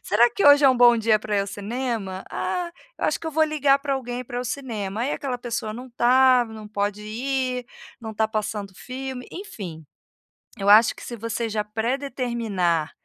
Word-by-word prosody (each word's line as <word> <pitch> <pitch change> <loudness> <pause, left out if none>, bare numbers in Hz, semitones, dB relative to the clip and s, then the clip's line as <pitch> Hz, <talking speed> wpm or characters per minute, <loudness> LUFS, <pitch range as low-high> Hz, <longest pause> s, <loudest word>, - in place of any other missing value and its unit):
Será 235 +4 +4
que 400 - +1
hoje 285 0 +8
é - - +9
um 255 - +1
bom 240 -1 +7
dia 220 -1 +3
para 210 0 -2
ir 200 - +3
ao 195 - -2
cinema? 205 -2 -4
Ah, 355 -1 -2 0.3
eu - - -2
acho - - 0
que 330 - -8
eu - - -2
vou 315 +1 +3
ligar 290 -3 +3
para 280 -1 -1
alguém 250 -1 -4
para 245 +1 -4
o - - -5
cinema." 225 -6 -4
Aí 270 - -1
aquela 265 -4 -3
pessoa 235 -3 -4
não 250 +2 -9
tá, 250 +1 +5
não 220 -1 -9
pode 205 0 -2
ir, 250 +3 -2 0.3
não 220 -1 -7
tá 220 +1 +2
passando 210 -2 -3
filme, 260 +2 -6
enfim. 190 - -8 0.7
Eu 200 +1 0
acho 220 +2 +7
que - - -12
se 240 - -6
você 230 +1 -3
já 210 -1 -1
pré-determinar 225 - -1
235 Hz, 200 wpm, -24 LUFS, 210-260 Hz, 0.7 s, é